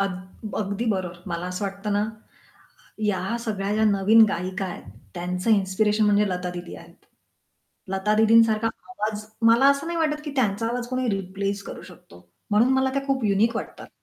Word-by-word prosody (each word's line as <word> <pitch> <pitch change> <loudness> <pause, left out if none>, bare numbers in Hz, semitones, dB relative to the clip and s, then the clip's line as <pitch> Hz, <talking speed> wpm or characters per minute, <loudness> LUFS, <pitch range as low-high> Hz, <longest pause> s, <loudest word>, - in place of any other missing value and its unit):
अग 190 +2 -5
अगदी 200 +2 -2
बरोबर. 180 -3 -3
मला 170 -1 -3
असं 180 +3 -4
वाटतं 200 +1 -3
ना, 205 0 +2 1.0
ह्या 205 +1 -1
सगळ्या 200 -2 -2
ज्या 220 +1 +2
नवीन 210 +2 +6
गायिका 185 +2 -3
आहेत, 180 - -7 0.3
त्यांचं 180 +4 -2
इन्स्पिरेशन 210 +1 +2
म्हणजे 205 0 +3
लता 180 -1 -3
दीदी 175 0 -7
आहेत. - - -15 1.0
लता 195 +2 +1
दीदींसारखा 225 0 +5 0.2
आवाज 215 - -3 0.3
मला 235 +4 +5
असं 280 +2 -1
नाही 340 0 -2
वाटत, 305 -2 0
की 300 - -4
त्यांचा 225 -3 +1
आवाज 240 +1 -3
कोणी 255 0 -1
रिप्लेस 195 +1 -3
करू - - -8
शकतो. 90 0 -16 0.2
म्हणून 215 +4 +4
मला 265 0 +2
त्या 275 0 -1
खूप 270 -3 0
युनिक 215 +3 +2
वाटतात. - - -7
205 Hz, 165 wpm, -24 LUFS, 190-230 Hz, 1.0 s, नवीन